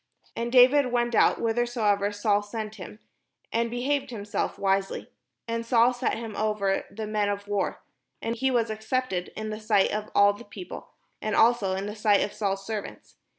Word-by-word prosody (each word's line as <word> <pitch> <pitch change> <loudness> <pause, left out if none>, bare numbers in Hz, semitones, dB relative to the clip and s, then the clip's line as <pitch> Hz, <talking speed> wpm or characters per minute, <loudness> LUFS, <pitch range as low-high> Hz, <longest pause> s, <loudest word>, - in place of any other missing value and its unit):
And 235 +1 -3
David 260 +2 +6
went 240 -1 +1
out - - +4
whithersoever 225 -3 +1
Saul 205 0 +1
sent 215 +1 -6
him, 195 - -9 0.6
and 230 +1 +1
behaved 270 +3 -1
himself 205 -3 -3
wisely: 195 0 -1 0.4
and 230 0 -2
Saul 235 +1 +4
set 245 - -1
him 225 -2 -6
over 210 -2 0
the 220 +1 -6
men 210 -1 0
of 205 0 -4
war, 205 -1 -2 0.4
and 230 - -2
he 265 +3 +1
was 235 -3 +1
accepted 220 -4 -2
in 215 0 -4
the 215 - -5
sight 215 -2 +2
of 210 0 -3
all 205 0 +6
the 205 - -11
peo 235 - -9
ple, - - -8 0.3
and 215 -1 -1
also 225 -5 +3
in 195 +1 -3
the 210 +1 -5
sight 210 -2 +3
of - - -4
Saul's 195 -2 -2
servants. 215 -1 -6
215 Hz, 185 wpm, -27 LUFS, 205-235 Hz, 0.6 s, David